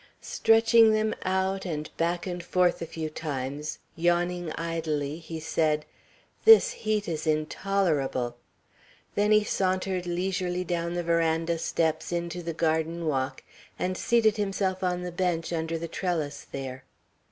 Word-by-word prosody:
Stretching 225 0 +5
them 215 0 +1
out, 190 +1 0
and 155 -4 -5
back 170 +1 0
and 180 -2 -4
forth 180 0 +2
a 165 - -3
few 160 -1 -4
times, 150 -1 -4 0.2
yawning 175 0 +1
idly, 160 -3 -2
he 165 -1 -7
said, 155 -1 0 0.6
"This 450 +2 +8
heat 215 - -1
is 160 -1 -3
intolerable!" 155 -6 0 0.8
Then 205 +1 +2
he 215 0 +6
sauntered 185 -2 -1
leisurely 180 0 -1
down 170 0 -2
the 175 - -1
veranda 165 0 +1
steps 160 0 0
into 170 0 -2
the 170 0 -3
garden 165 +1 0
walk, 135 -3 -1 0.3
and 185 0 -1
seated 225 0 +3
himself 195 -2 -1
on 180 -1 0
the 180 - -4
bench 175 -1 -1
under 165 0 -1
the 170 +1 -4
trellis 155 -6 -3
there. 130 -1 -6
170 Hz, 140 wpm, -27 LUFS, 160-185 Hz, 0.8 s, This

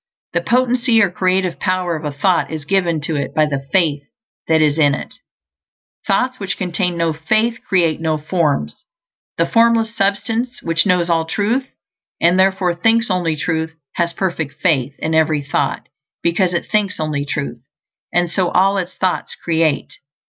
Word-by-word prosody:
The - - +1
potency, 250 -1 +2
or 200 -5 +3
creative 185 0 0
power, 185 -3 0
of 155 0 -6
a 150 - -2
thought 175 +6 +1
is 155 -2 -6
given 175 -3 +1
to 155 +2 -2
it 140 0 -3
by 155 - +4
the 140 -2 -4
faith 160 -7 +2 0.5
that 160 0 +3
is 155 0 +2
in 145 -2 +4
it. - - -8 0.9
Thoughts 255 0 +1
which 195 -2 -3
contain 180 -1 -1
no 165 -1 +1
faith 220 +9 0
create 165 -4 +1
no 160 -1 0
forms. 155 -1 -1 0.5
The - - +3
Formless 230 -1 +2
Substance, 225 +5 -1
which 165 +3 +1
knows 180 -2 +2
all 165 -1 +1
truth 225 +10 -1 0.5
and 175 +2 +3
therefore 190 -2 +2
thinks 225 +5 +2
only 175 -3 0
truth, 160 +1 -2 0.2
has 170 -1 0
perfect 170 -5 -3
faith 140 -6 +1
in 160 - -2
every 155 -2 +2
thought, 140 - -2 0.4
because 175 +1 +1
it - - -3
thinks 210 -5 +1
only 155 -2 -1
truth; 140 -4 -4 0.5
and 175 0 +2
so 180 +1 0
all 195 +2 +3
its 180 -1 -5
thoughts 185 -1 -1
create. 160 -3 0
175 Hz, 165 wpm, -18 LUFS, 155-195 Hz, 0.9 s, by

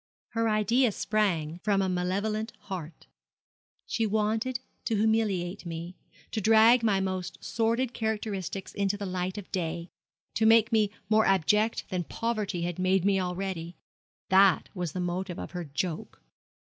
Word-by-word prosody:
Her 230 -1 0
idea 220 +3 +3
sprang 180 -7 0
from 200 +1 +1
a - - 0
malevolent 200 +5 -1
heart. 180 -6 -7 0.8
She 225 - 0
wanted 220 +4 0 0.3
to 225 - 0
humiliate 205 -4 +1
me 170 +1 -6 0.4
to 220 - -2
drag 225 +3 +6
my 210 -4 +2
most 185 -2 -3
sordid 230 +2 0
characteristics 210 -4 -3
into 200 0 0
the 200 - -4
light 185 +1 -3
of 205 - -8
day 170 -1 -3 0.4
to 220 - +3
make 225 +1 +5
me 215 -2 +3 0.2
more 220 +1 +4
abject 210 +4 +2
than 180 -1 -1
poverty 215 -6 -2
had 175 0 -3
made 185 0 +2
me 195 -1 +3
already. 180 -2 -4 0.5
That 190 -2 +5
was 180 -5 -3
the 185 - -3
motive 180 0 -3
of - - -6
her 180 -2 -5
joke.' 155 +3 -4
195 Hz, 145 wpm, -28 LUFS, 180-220 Hz, 0.8 s, drag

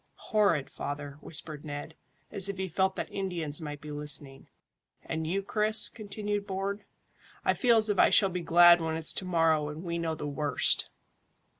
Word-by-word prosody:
"Horrid, 200 - +2
father," 145 0 -6
whispered 150 -1 -6
Ned, 145 +1 -7 0.4
as 200 -2 +2
if 200 - -4
he 190 0 -3
felt 190 +2 0
that - - -5
Indians 170 -6 -3
might 145 -2 -7
be 150 - -8
listening. 145 -2 -2 0.6
"And 160 -1 -3
you, 195 +4 -1
Chris?" 215 +2 +3
continued 205 -1 -4
Bourne. 195 +2 -4 0.6
"I - - +3
feel 235 -3 +3
as 220 0 +1
if 205 -2 0
I - - +6
shall 195 - +5
be 180 0 -3
glad 175 +1 +6
when 160 -1 -2
it's 160 -1 +1
to 190 - -2
morrow 165 -4 +2
and 155 +3 -8
we 170 -1 -3
know 165 -1 -2
the 150 - -6
worst." 145 -2 +1
170 Hz, 180 wpm, -29 LUFS, 150-195 Hz, 0.6 s, I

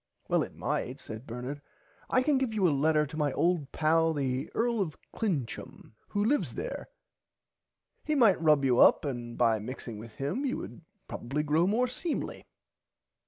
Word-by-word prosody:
Well - - +2
it - - -5
might - - -2
said 110 +4 -8
Bernard 125 +5 -5 0.5
I 255 - +3
can 285 -1 +3
give 245 -5 -1
you 195 -4 +3
a 155 - +2
letter 150 +2 +3
to 155 +2 -8
my 150 -2 +1
old 170 -5 +1
pal 160 +1 +3
the 135 0 -1
Earl 235 -1 +1
of 165 -6 -3 0.2
Clincham 160 - -3 0.2
who 205 0 0
lives 285 +6 +1
there - - -5 1.2
he 305 - 0
might 225 - +5
rub 150 -4 +4
you 125 -2 +3
up - - +6
and 120 -4 -4
by 115 -2 +3
mixing 115 -1 -7
with 110 0 -10
him 145 - -2
you 270 -2 -1
would - - -8 0.3
probably 135 +5 -3
grow 155 +4 +2
more 235 +5 +2
seemly. 290 +6 -4
155 Hz, 170 wpm, -30 LUFS, 130-215 Hz, 1.2 s, up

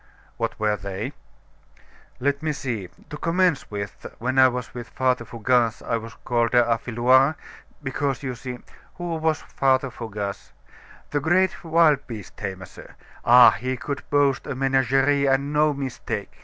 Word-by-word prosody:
"What - - -3
were 105 -1 +1
they?" 95 0 -5 1.1
"Let 140 +2 0
me 155 -1 -1
see 115 -10 -4 0.2
to 150 - -5
commence 170 -1 +1
with, 100 -2 -6
when 130 +3 0
I 130 - +8
was 125 -1 -4
with 120 -1 -7
Father 130 -2 0
Fougasse, 115 +1 +1
I 115 - 0
was 115 0 -9
called 120 -1 +1
Affiloir, 120 +4 +3 0.5
because 135 0 -2
you 130 -2 -3
see 125 +1 -7 0.2
" - - -27
"Who 175 -1 -4
was 160 -1 0
this - - -21
Father 130 -1 +2
Fougasse?" 105 -4 -6 0.6
"The 145 - +1
great 175 +5 +1
wild 160 -4 +3
beast 110 -7 -8
tamer, 95 -2 -6
sir. - - -14 0.3
Ah! 125 +1 +8
he 130 0 -3
could 140 +2 -4
boast 140 -2 +2
of - - -2
a - - -8
menagerie 135 +1 +2
and 140 +2 +1
no 150 0 +4
mistake! 135 -3 -4
130 Hz, 160 wpm, -24 LUFS, 115-145 Hz, 1.1 s, I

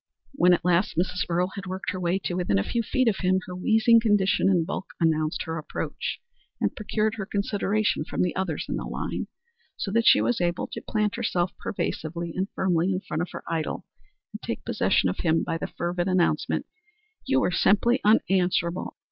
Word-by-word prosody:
When 180 -10 +5
at 170 - -7
last 180 -1 +2
Mrs. 180 +1 0
Earle 180 +2 +1
had 195 -1 -7
worked 185 +1 -3
her 185 - -5
way 175 +1 +1
to - - -2
within 175 - +1
a 95 - +2
few 235 - -1
feet 255 +3 +1
of 215 - +2
him, 185 0 +2
her 180 - -7
wheezing 220 +4 +4
condition 205 -4 +3
and 175 -4 +3
bulk 190 - -4
announced 155 -2 +1
her 160 0 -4
approach, 155 - -4 0.4
and - - 0
procured 215 0 -1
her 195 - -3
consideration 205 -2 0
from - - -1
the 180 - -1
others 185 -5 -2
in - - -2
the - - -4
line, - - -4 0.5
so 195 - -3
that 230 +2 +2
she - - +8
was 240 -6 +1
able 175 0 0
to - - -5
plant 215 0 -1
herself 180 -6 0
pervasively 170 -2 -3
and 190 +2 -1
firmly 180 0 +1
in 185 0 -1
front 155 -3 -3
of 175 - -3
her - - -7
idol 160 -2 -2 0.5
and - - -7
take - - -5
possession - - +2
of 90 - -2
him 165 -1 +2
by - - -2
the - - -3
fervid 175 +1 -2
announcement, 185 -2 +1 0.6
"You 270 0 +3
were 185 - +1
simply 225 +8 +3
unanswerable. 185 -4 +2
185 Hz, 200 wpm, -26 LUFS, 170-210 Hz, 0.6 s, she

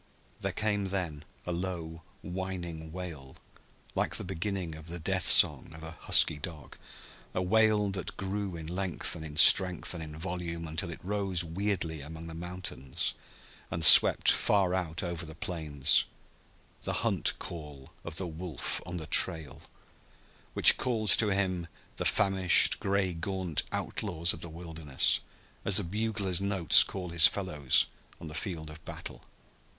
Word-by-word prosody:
There - - -3
came 105 -2 -2
then 90 -6 -5 0.2
a 90 - -5
low, 85 -2 -6 0.2
whining 90 -3 -7
wail, 80 -7 -9 0.6
like - - -2
the - - -1
beginning 95 -1 -5
of 80 +1 -13
the 85 +1 -6
"death 80 - -1
song" - - +4
of 80 - -13
a 80 - -7
husky 80 -1 +3
dog 80 0 -10 0.6
a 90 - -1
wail 105 +1 +1
that 95 -2 -7
grew 95 -1 -5
in 80 -1 -9
length 90 +1 0
and 80 - -9
in 75 -1 -10
strength 90 +2 +5
and 85 - -8
in 75 -1 -10
volume 85 -1 -6
until 80 +1 -3
it 85 - -11
rose 95 -3 -3
weirdly 85 -2 -4
among 80 +3 -11
the 80 - -10
mountains 85 -6 -3 0.6
and 85 0 0
swept - - +9
far 95 -3 0
out 90 -1 -3
over 85 -1 -5
the 80 0 -11
plains 80 -5 0 0.8
the - - -3
hunt - - +1
call 75 -5 -10
of 85 - -7
the 95 - +2
wolf 85 -3 -6
on 90 0 -6
the 80 - -7
trail, 80 -4 +3 0.9
which - - +7
calls 110 -5 +3
to 110 - 0
him 95 -3 -2 0.3
the - - -4
famished, 95 -3 +4
gray 95 -2 -2
gaunt 90 -1 -1
outlaws 85 +2 -2
of 85 - -12
the 85 - -8
wilderness, 80 -4 -1 0.4
as 100 - +3
the 105 - +1
bugler's 100 -1 -3
notes 95 -5 +4
call 90 -2 -8
his 85 -2 +7
fellows 75 -9 0 0.3
on 85 - -10
the 75 - -10
field 80 -4 -6
of 80 +1 -15
battle. - - -10
85 Hz, 155 wpm, -28 LUFS, 80-95 Hz, 0.9 s, swept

